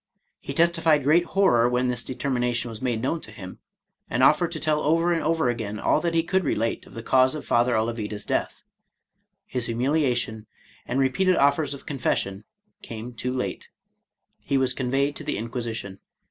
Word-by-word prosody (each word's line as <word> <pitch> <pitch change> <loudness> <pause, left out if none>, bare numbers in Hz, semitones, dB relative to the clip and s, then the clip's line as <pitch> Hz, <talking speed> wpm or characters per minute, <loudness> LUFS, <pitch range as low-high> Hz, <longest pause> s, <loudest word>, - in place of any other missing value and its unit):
He - - -7
testified 165 -3 +3
great 160 +5 +4
horror 125 -12 +3
when 125 +1 +1
this 125 -1 -1
determina 125 -1 -1
tion 120 0 -2
was 110 -1 -8
made 120 -3 -1
known 160 +5 -1
to - - -10
him, 95 -3 -10 0.3
— - - -47
and 120 +3 +1
offered 160 +5 +4
to 155 - -4
tell 155 -1 +1
over 165 +4 +2
and 165 - 0
over 160 -2 +1
again 110 -3 -3
all 150 - +2
that 170 -1 -1
he 165 - +3
could 190 +2 +1
relate 115 -6 -1
of - - -15
the 115 - -6
cause 130 +2 +3
of 155 - -6
Father 120 0 +2
Olavida's 110 -2 -2
death. - - -2 0.8
His 125 -2 -3
humiliation, 120 -3 0 0.4
and 135 - -1
repeated 180 +8 +2
oflFers 140 +1 +2
of 140 - -14
confession, 105 -7 -2 0.4
came 115 +2 -8
too 125 +2 -3
late. 130 0 -4 0.7
He 140 - -1
was 130 -1 +1
conveyed 135 +3 0
to - - -7
the 150 - -2
Inquisi 115 +1 -4
tion. 100 -3 -7
130 Hz, 190 wpm, -25 LUFS, 115-155 Hz, 0.8 s, great